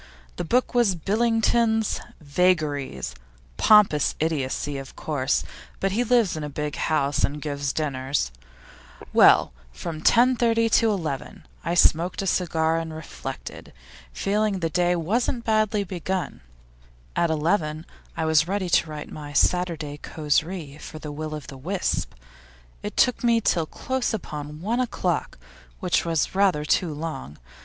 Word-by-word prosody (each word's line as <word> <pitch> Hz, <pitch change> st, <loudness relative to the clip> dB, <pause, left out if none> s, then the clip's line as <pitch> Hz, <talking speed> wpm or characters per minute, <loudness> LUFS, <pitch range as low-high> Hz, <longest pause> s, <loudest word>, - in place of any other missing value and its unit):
The -, -, -2 dB
book 245 Hz, +10 st, +1 dB
was 235 Hz, -6 st, +3 dB
Billington's 225 Hz, +3 st, +1 dB, 0.2 s
"Vagaries"; 145 Hz, -, 0 dB, 0.4 s
pompous 205 Hz, -9 st, +5 dB
idiocy, 145 Hz, -2 st, -1 dB
of 135 Hz, -, -10 dB
course, 140 Hz, -3 st, 0 dB, 0.4 s
but 195 Hz, -, 0 dB
he 230 Hz, +5 st, +1 dB
lives 235 Hz, -6 st, +3 dB
in 155 Hz, -, -4 dB
a 150 Hz, -, -4 dB
big 150 Hz, +1 st, -4 dB
house 145 Hz, -3 st, 0 dB
and 145 Hz, +2 st, 0 dB
gives 145 Hz, -2 st, -2 dB
dinners. 135 Hz, -, -1 dB, 0.8 s
Well, -, -, +6 dB, 0.2 s
from 155 Hz, -, -6 dB
10.30 230 Hz, 0 st, +4 dB
to 230 Hz, -1 st, +4 dB
11, 160 Hz, -10 st, -4 dB, 0.2 s
I 170 Hz, -, -1 dB
smoked 175 Hz, +2 st, +3 dB
a -, -, -3 dB
cigar 165 Hz, -3 st, +1 dB
and 165 Hz, -1 st, -5 dB
reflected, 160 Hz, -1 st, -8 dB, 0.4 s
feeling 210 Hz, -, 0 dB
that 190 Hz, -, -4 dB
the 165 Hz, -, 0 dB
day 175 Hz, +2 st, +2 dB
wasn't 235 Hz, -, -1 dB
badly 215 Hz, -1 st, +2 dB
begun. 180 Hz, -, -4 dB, 0.7 s
At 170 Hz, -, +2 dB
eleven 160 Hz, 0 st, 0 dB, 0.3 s
I 160 Hz, -, 0 dB
was 160 Hz, 0 st, +3 dB
ready 190 Hz, -2 st, -2 dB
to 165 Hz, -, +3 dB
write 150 Hz, -1 st, -7 dB
my 145 Hz, -1 st, -8 dB
Saturday 160 Hz, -3 st, +1 dB
causerie 155 Hz, 0 st, -2 dB
for 155 Hz, -, -9 dB
the 155 Hz, -1 st, -7 dB
Will 155 Hz, +1 st, -5 dB
o' -, -, -4 dB
the 140 Hz, -, -10 dB
Wisp; 180 Hz, -, -2 dB, 0.7 s
it -, -, -6 dB
took 250 Hz, -1 st, +3 dB
me 235 Hz, -1 st, +4 dB
till 170 Hz, -7 st, +1 dB
close 260 Hz, +2 st, -2 dB
upon 150 Hz, -5 st, -7 dB
one 225 Hz, +6 st, 0 dB
o'clock, 185 Hz, -8 st, -1 dB, 0.4 s
which -, -, +1 dB
was 165 Hz, -2 st, 0 dB
rather 190 Hz, -6 st, +2 dB
too 165 Hz, +2 st, +1 dB
long. 145 Hz, -, -6 dB
165 Hz, 145 wpm, -24 LUFS, 150-205 Hz, 0.8 s, Well